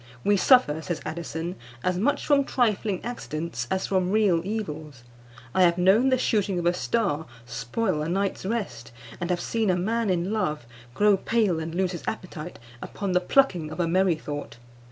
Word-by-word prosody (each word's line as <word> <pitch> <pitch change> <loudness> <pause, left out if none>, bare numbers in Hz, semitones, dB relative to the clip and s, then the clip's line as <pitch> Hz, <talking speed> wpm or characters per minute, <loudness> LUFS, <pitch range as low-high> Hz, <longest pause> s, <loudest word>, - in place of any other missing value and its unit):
"We 205 - +4
suffer," 195 - +4
says 165 -1 -3
Addison, 170 +2 -4 0.3
"as 180 0 +1
much 275 +8 +1
from 285 -1 +4
trifling 215 -7 0
accidents 160 - -4
as 190 - 0
from 185 -2 +1
real 200 -5 +3
evils. 155 - -5 0.5
I 185 - +3
have 170 -1 +5
known 195 +9 +4
the 260 - +3
shooting 205 -6 +1
of 175 - -2
a 175 - +4
star 180 -5 -1 0.2
spoil 150 - -2
a 155 - -2
night's 195 +2 -1
rest, 185 - -3 0.3
and 175 -1 -3
have 180 -1 +1
seen 220 +3 0
a 185 - +3
man 220 +4 0
in 180 +1 0
love 150 - -1 0.3
grow 205 -1 +4
pale 210 -5 +1
and 160 +1 -5
lose 185 0 +1
his 175 - -6
appetite 180 -5 -5 0.2
upon 200 -1 -4
the 180 0 +3
plucking 180 - +2
of 155 - -8
a 175 - +2
merrythought. 155 -8 -1
185 Hz, 175 wpm, -26 LUFS, 160-210 Hz, 0.5 s, have